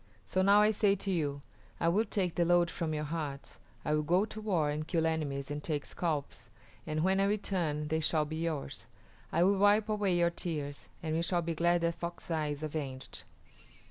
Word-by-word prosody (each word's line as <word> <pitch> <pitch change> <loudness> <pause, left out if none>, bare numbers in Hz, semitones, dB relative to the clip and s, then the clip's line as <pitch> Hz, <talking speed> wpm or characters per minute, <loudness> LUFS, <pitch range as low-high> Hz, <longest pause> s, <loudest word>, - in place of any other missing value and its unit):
So 110 - 0
now 200 +2 +6
I 215 - +5
say 205 -1 +3
to 195 0 -3
you, 145 -5 -1 0.4
I 165 - +1
will 200 +7 +3
take 190 -4 0
the 175 - +2
load 175 0 +3
from 165 -2 -2
your 150 -1 -2
hearts; 150 -3 -5 0.3
I 150 - +1
will 150 - +2
go 175 +7 +2
to 215 0 -8
war 175 -9 +1
and 155 +1 -3
kill 165 -1 +1
enemies 145 -4 -1
and 145 0 -4
take 150 -3 -1
scalps, 155 -5 -3 0.4
and 155 0 0
when 190 +1 +3
I 195 - +4
return 175 -7 0
they 160 +1 +1
shall 155 -1 +2
be 155 +1 -5
yours. 160 -3 -3 0.4
I 170 - +3
will 195 +1 +3
wipe 205 +2 +4
away 205 -4 +1
your 170 0 +3
tears, 150 -5 -4
and 155 -1 -1
we 165 - +1
shall 175 +1 +1
be 165 0 -1
glad 170 +2 +2
that 170 0 +1
Fox 170 +1 -6
Eye 155 -2 0
is 145 +1 -4
avenged." 140 -4 -5
165 Hz, 210 wpm, -32 LUFS, 150-185 Hz, 0.4 s, now